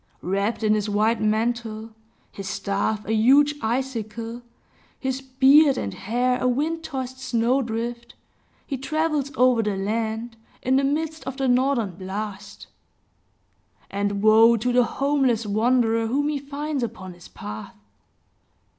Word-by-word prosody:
Wrapped 200 Hz, +5 st, -1 dB
in 215 Hz, 0 st, +3 dB
his 210 Hz, 0 st, -1 dB
white 215 Hz, +3 st, +1 dB
mantle, 220 Hz, 0 st, -1 dB, 0.4 s
his 195 Hz, -1 st, -7 dB
staff 200 Hz, +2 st, -2 dB
a 220 Hz, -, -1 dB
huge 275 Hz, +7 st, +5 dB
icicle, 230 Hz, -1 st, -3 dB, 0.6 s
his 265 Hz, 0 st, -2 dB
beard 270 Hz, +2 st, +5 dB
and 100 Hz, -, -3 dB
hair 250 Hz, +4 st, 0 dB
a -, -, +2 dB
wind 310 Hz, +6 st, -1 dB
tossed 260 Hz, -3 st, -5 dB
snow 255 Hz, +1 st, +1 dB
drift, 235 Hz, 0 st, -5 dB, 0.5 s
he 275 Hz, -3 st, -4 dB
travels 305 Hz, 0 st, -1 dB
over 250 Hz, -2 st, +4 dB
the 210 Hz, -3 st, -2 dB
land, 220 Hz, +3 st, -3 dB, 0.3 s
in 260 Hz, +1 st, +3 dB
the 275 Hz, -, +2 dB
midst 315 Hz, +3 st, -1 dB
of 265 Hz, 0 st, -5 dB
the 270 Hz, -1 st, 0 dB
northern 245 Hz, -7 st, +1 dB
blast; 200 Hz, +1 st, -6 dB, 1.3 s
and 200 Hz, 0 st, -2 dB
woe 225 Hz, +2 st, +6 dB
to 245 Hz, +3 st, -1 dB
the 245 Hz, -1 st, +4 dB
homeless 270 Hz, -4 st, +1 dB
wanderer 225 Hz, +1 st, +2 dB
whom 285 Hz, +5 st, 0 dB
he 295 Hz, -2 st, -1 dB
finds 285 Hz, +1 st, -4 dB
upon 205 Hz, -6 st, -5 dB
his 175 Hz, 0 st, -15 dB
path! 105 Hz, 0 st, -8 dB
235 Hz, 135 wpm, -24 LUFS, 215-265 Hz, 1.3 s, woe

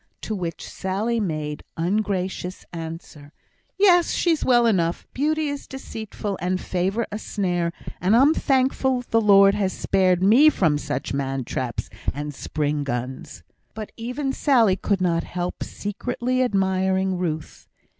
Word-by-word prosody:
To 220 Hz, -, -4 dB
which 170 Hz, -6 st, -4 dB
Sally 210 Hz, +5 st, -2 dB
made 155 Hz, -6 st, -3 dB, 0.2 s
ungracious 185 Hz, 0 st, -2 dB
answer, 160 Hz, -3 st, -8 dB, 0.5 s
"Yes! 360 Hz, -4 st, +5 dB
she's 330 Hz, -3 st, +1 dB
well 240 Hz, -2 st, +4 dB
enough. 175 Hz, -6 st, +1 dB
Beauty 310 Hz, +3 st, 0 dB
is 285 Hz, -1 st, -5 dB
deceitful, 220 Hz, -6 st, -6 dB
and 185 Hz, +1 st, 0 dB
favour 190 Hz, +6 st, -1 dB
a 210 Hz, -, -4 dB
snare, 175 Hz, -6 st, -1 dB, 0.3 s
and 190 Hz, +5 st, +3 dB
I'm 275 Hz, +6 st, +6 dB
thankful 265 Hz, -2 st, +1 dB
the 225 Hz, -, +4 dB
Lord 200 Hz, -2 st, +6 dB
has 200 Hz, -2 st, 0 dB
spared 185 Hz, -1 st, +2 dB
me 245 Hz, +10 st, +7 dB
from 160 Hz, -, +1 dB
such 140 Hz, -1 st, -3 dB
man 135 Hz, -1 st, -2 dB
traps 120 Hz, 0 st, -3 dB, 0.3 s
and 145 Hz, +1 st, -4 dB
spring 145 Hz, +1 st, -2 dB
guns." 130 Hz, -1 st, -5 dB, 0.3 s
But 215 Hz, -1 st, -6 dB
even 250 Hz, +4 st, -3 dB
Sally 235 Hz, -11 st, +3 dB
could 195 Hz, 0 st, -1 dB
not 170 Hz, -2 st, +1 dB
help 180 Hz, 0 st, -4 dB
secretly 245 Hz, +5 st, -2 dB
admiring 190 Hz, -4 st, +1 dB
Ruth. 160 Hz, -3 st, -4 dB
190 Hz, 135 wpm, -23 LUFS, 170-235 Hz, 0.5 s, me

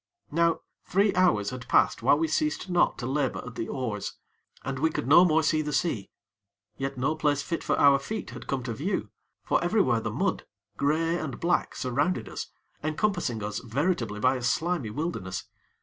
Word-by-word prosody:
Now 165 Hz, +1 st, +2 dB, 0.2 s
three 200 Hz, +1 st, +2 dB
hours 175 Hz, -, +3 dB
had 125 Hz, -1 st, -7 dB
passed -, -, +3 dB
whilst 140 Hz, +5 st, +4 dB
we 165 Hz, -, +2 dB
ceased 250 Hz, -, -1 dB
not 175 Hz, 0 st, +3 dB
to 120 Hz, -, -5 dB
labor 135 Hz, +1 st, -1 dB
at 125 Hz, -, -8 dB
the 115 Hz, -, -4 dB
oars, 115 Hz, -6 st, -3 dB, 0.5 s
and 135 Hz, -1 st, -3 dB
we 160 Hz, +3 st, +3 dB
could -, -, -3 dB
no 160 Hz, +5 st, +8 dB
more 160 Hz, -2 st, +3 dB
see 155 Hz, 0 st, +2 dB
the 150 Hz, -1 st, -3 dB
sea; 115 Hz, -, 0 dB, 0.7 s
yet 135 Hz, +2 st, -4 dB
no 135 Hz, +5 st, +1 dB
place 145 Hz, -2 st, +1 dB
fit 165 Hz, -, -3 dB
for -, -, +1 dB
our 140 Hz, -1 st, +6 dB
feet 215 Hz, +9 st, -5 dB
had -, -, -9 dB
come 135 Hz, -2 st, -2 dB
to 115 Hz, -1 st, -3 dB
view, 160 Hz, -, -2 dB, 0.3 s
for -, -, +1 dB
everywhere 175 Hz, -, +3 dB
the 115 Hz, -, -3 dB
mud, 165 Hz, -, -1 dB, 0.3 s
grey 165 Hz, +4 st, +1 dB
and 145 Hz, -6 st, -5 dB
black, 175 Hz, +1 st, +1 dB
surrounded 140 Hz, +8 st, 0 dB
us -, -, -5 dB, 0.4 s
encompassing 155 Hz, -, -1 dB
us 105 Hz, 0 st, -3 dB
veritably 120 Hz, -, -1 dB
by 130 Hz, +4 st, +3 dB
a -, -, -6 dB
slimy 155 Hz, +1 st, 0 dB
wilderness. 105 Hz, -, -3 dB
145 Hz, 185 wpm, -27 LUFS, 125-170 Hz, 0.7 s, no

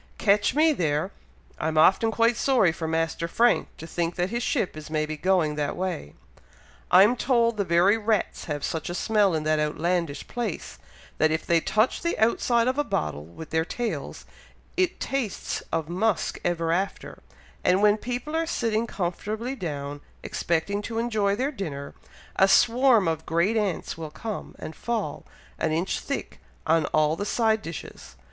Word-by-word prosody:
Catch 205 Hz, +3 st, +3 dB
me 310 Hz, +1 st, +5 dB
there! 160 Hz, -, 0 dB, 0.5 s
I'm 155 Hz, 0 st, -1 dB
often 190 Hz, +8 st, +5 dB
quite 230 Hz, +1 st, +2 dB
sorry 245 Hz, -11 st, +3 dB
for 160 Hz, 0 st, -5 dB
Master 165 Hz, +1 st, -1 dB
Frank, 235 Hz, +7 st, +3 dB
to 160 Hz, -, -8 dB
think 170 Hz, +1 st, -2 dB
that 180 Hz, +2 st, -1 dB
his 235 Hz, +1 st, -1 dB
ship 190 Hz, -, -1 dB
is 155 Hz, -1 st, -9 dB
maybe 155 Hz, 0 st, -1 dB
going 175 Hz, -2 st, +2 dB
that 145 Hz, -1 st, -1 dB
way! 180 Hz, -, -4 dB, 0.7 s
I'm 210 Hz, +6 st, +6 dB
told 235 Hz, -2 st, +2 dB
the 205 Hz, -, 0 dB
very 185 Hz, +5 st, +3 dB
rats 215 Hz, 0 st, -1 dB
have 145 Hz, -3 st, -4 dB
such 160 Hz, 0 st, -3 dB
a 175 Hz, -, -3 dB
smell 205 Hz, -2 st, +2 dB
in 155 Hz, -, -1 dB
that 155 Hz, 0 st, +1 dB
outlandish 155 Hz, 0 st, -1 dB
place, 210 Hz, -, -4 dB, 0.4 s
that 155 Hz, -, +4 dB
if 160 Hz, 0 st, -1 dB
they 170 Hz, -1 st, +3 dB
touch 215 Hz, +8 st, +1 dB
the 340 Hz, -, -1 dB
outside 235 Hz, +2 st, +2 dB
of 260 Hz, +3 st, 0 dB
a -, -, +3 dB
bottle 75 Hz, -, -2 dB
with 85 Hz, -, -11 dB
their 160 Hz, 0 st, +2 dB
tails, 190 Hz, -, -4 dB, 0.5 s
it 370 Hz, -1 st, +1 dB
tastes 265 Hz, -7 st, -2 dB
of 165 Hz, -2 st, -1 dB
musk 185 Hz, +1 st, 0 dB
ever 165 Hz, -2 st, 0 dB
after; 190 Hz, +4 st, -2 dB, 0.4 s
and 185 Hz, +3 st, +3 dB
when 210 Hz, 0 st, +5 dB
people 245 Hz, +7 st, -4 dB
are 325 Hz, 0 st, 0 dB
sitting 230 Hz, -5 st, 0 dB
comfortably 210 Hz, +6 st, -3 dB
down, 145 Hz, -, -5 dB, 0.2 s
expecting 175 Hz, +5 st, -1 dB
to 225 Hz, +2 st, -5 dB
enjoy 215 Hz, -4 st, +1 dB
their 265 Hz, +6 st, -1 dB
dinner, 150 Hz, -, -6 dB, 0.4 s
a 195 Hz, -, +6 dB
swarm 240 Hz, -1 st, +5 dB
of 160 Hz, -1 st, -2 dB
great 170 Hz, +7 st, +2 dB
ants 200 Hz, -6 st, -2 dB
will 160 Hz, -1 st, -5 dB
come, 215 Hz, +7 st, -6 dB
and 160 Hz, -, -8 dB
fall, 220 Hz, -11 st, -3 dB, 0.3 s
an -, -, 0 dB
inch 170 Hz, +4 st, -1 dB
thick, 280 Hz, -, -5 dB, 0.3 s
on 160 Hz, -1 st, +3 dB
all 155 Hz, 0 st, +2 dB
the 200 Hz, -, -3 dB
side 220 Hz, +1 st, +1 dB
dishes. 160 Hz, -, -9 dB
185 Hz, 170 wpm, -26 LUFS, 160-225 Hz, 0.7 s, I'm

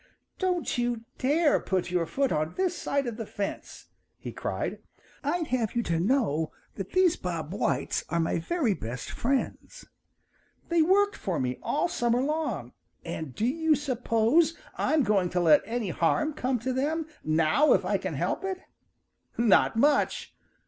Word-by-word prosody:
"Don't 360 Hz, -8 st, 0 dB
you 240 Hz, -1 st, -1 dB, 0.2 s
dare 295 Hz, +4 st, +3 dB
put 185 Hz, -2 st, -2 dB
your 175 Hz, -2 st, 0 dB
foot 275 Hz, +6 st, 0 dB
on 155 Hz, +1 st, -1 dB
this 370 Hz, -1 st, 0 dB
side 280 Hz, -4 st, -1 dB
of 235 Hz, -3 st, -4 dB
the 225 Hz, -, -4 dB
fence!" 200 Hz, -1 st, -6 dB, 0.3 s
he -, -, -7 dB
cried. -, -, -3 dB, 0.4 s
"I'd 320 Hz, +3 st, -1 dB
have 240 Hz, -4 st, -1 dB
you 235 Hz, -, +1 dB
to 165 Hz, -4 st, 0 dB
know 175 Hz, -, +1 dB, 0.2 s
that 195 Hz, -2 st, -7 dB
these 370 Hz, -2 st, +4 dB
Bob 170 Hz, -2 st, -4 dB
Whites 140 Hz, -9 st, -1 dB
are 170 Hz, -, 0 dB
my 165 Hz, 0 st, 0 dB
very 265 Hz, -, 0 dB
best 120 Hz, -6 st, -6 dB
friends. 275 Hz, -, -2 dB, 0.8 s
They've 335 Hz, -1 st, +4 dB
worked 405 Hz, +2 st, +4 dB
for 185 Hz, -5 st, -2 dB
me 125 Hz, -1 st, -2 dB
all 300 Hz, -, 0 dB
summer 240 Hz, -5 st, +1 dB
long, 305 Hz, +2 st, -2 dB, 0.3 s
and 155 Hz, -6 st, -5 dB
do 220 Hz, -, 0 dB
you 320 Hz, +4 st, +2 dB
suppose 270 Hz, +4 st, +2 dB, 0.2 s
I'm 310 Hz, -2 st, +2 dB
going 200 Hz, -5 st, +2 dB
to 180 Hz, -, 0 dB
let 165 Hz, -3 st, +6 dB
any 225 Hz, -2 st, -2 dB
harm 240 Hz, -, +1 dB
come 255 Hz, -3 st, -1 dB
to 260 Hz, +2 st, -1 dB
them 305 Hz, +5 st, -1 dB, 0.2 s
now 155 Hz, -, +3 dB
if -, -, +1 dB
I -, -, +1 dB
can -, -, -4 dB
help -, -, -1 dB
it? 385 Hz, -1 st, -2 dB, 0.8 s
Not 230 Hz, -1 st, +4 dB
much! 285 Hz, +5 st, +2 dB
240 Hz, 165 wpm, -28 LUFS, -, 0.8 s, let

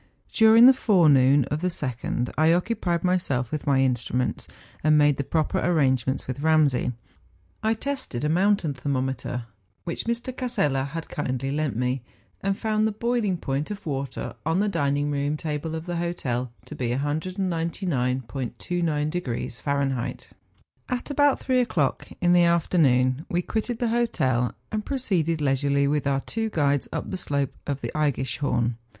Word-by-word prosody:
During 225 Hz, +1 st, +7 dB
the 265 Hz, -, +9 dB
forenoon 145 Hz, -, +5 dB
of 150 Hz, +1 st, -1 dB
the 180 Hz, -, +1 dB
2nd, 125 Hz, -6 st, -2 dB
I 160 Hz, +2 st, +4 dB
occupied 175 Hz, -2 st, 0 dB
myself 155 Hz, -10 st, 0 dB
with 155 Hz, -2 st, -4 dB
my 135 Hz, -2 st, +4 dB
instruments, 125 Hz, -1 st, -1 dB, 0.4 s
and 155 Hz, 0 st, +5 dB
made 145 Hz, -1 st, +4 dB
the 140 Hz, -, -1 dB
proper 155 Hz, +2 st, 0 dB
arrange¬ 135 Hz, -8 st, +2 dB
ments 130 Hz, -, -1 dB
with 130 Hz, +1 st, -5 dB
Ramsay. 150 Hz, -5 st, +2 dB, 0.7 s
I 220 Hz, +1 st, +1 dB
tested 260 Hz, -, -4 dB
a -, -, +2 dB
mountain 180 Hz, -1 st, +2 dB
thermo¬ 130 Hz, 0 st, -1 dB
meter 125 Hz, -2 st, -4 dB, 0.4 s
which 170 Hz, -, -4 dB
Mr. 235 Hz, +2 st, -3 dB
Casella 195 Hz, -, 0 dB
had 160 Hz, +3 st, -6 dB
kindly 135 Hz, -2 st, -3 dB
lent 150 Hz, -3 st, -1 dB
me, 125 Hz, +2 st, -1 dB, 0.4 s
and 195 Hz, 0 st, 0 dB
found 215 Hz, -1 st, +1 dB
the -, -, -1 dB
boiling 220 Hz, -3 st, 0 dB
point 140 Hz, -1 st, -2 dB
of 210 Hz, -1 st, -7 dB
water 140 Hz, -3 st, -4 dB
on 165 Hz, +4 st, +1 dB
the 210 Hz, -, +2 dB
dining 145 Hz, -5 st, 0 dB
room 145 Hz, +1 st, -1 dB
table 155 Hz, +1 st, -3 dB
of 160 Hz, 0 st, -5 dB
the 175 Hz, -1 st, -3 dB
hotel 130 Hz, -8 st, -2 dB
to -, -, -9 dB
be 125 Hz, -2 st, -2 dB
199°*29 150 Hz, -, -2 dB
Fahrenheit. 140 Hz, -3 st, -2 dB, 0.6 s
At 250 Hz, +3 st, -3 dB
about 285 Hz, -1 st, +3 dB
three 255 Hz, -1 st, +1 dB
o'clock 165 Hz, -, 0 dB
in 175 Hz, 0 st, +3 dB
the 175 Hz, -1 st, +6 dB
afternoon, 145 Hz, -6 st, +2 dB
we 175 Hz, +1 st, 0 dB
quitted 225 Hz, +4 st, -2 dB
the 240 Hz, -1 st, 0 dB
hotel, 130 Hz, -, +1 dB, 0.2 s
and 215 Hz, -1 st, -2 dB
proceeded 180 Hz, -, -1 dB
leisurely 140 Hz, 0 st, +2 dB
with 145 Hz, 0 st, 0 dB
our 135 Hz, -1 st, +1 dB
two 225 Hz, +6 st, -3 dB
guides 145 Hz, -6 st, +1 dB
up -, -, -4 dB
the -, -, -2 dB
slope 140 Hz, -6 st, -1 dB
of 140 Hz, -1 st, -2 dB
the -, -, -3 dB
Eggischhorn. 130 Hz, -4 st, 0 dB
150 Hz, 155 wpm, -25 LUFS, 135-185 Hz, 0.7 s, the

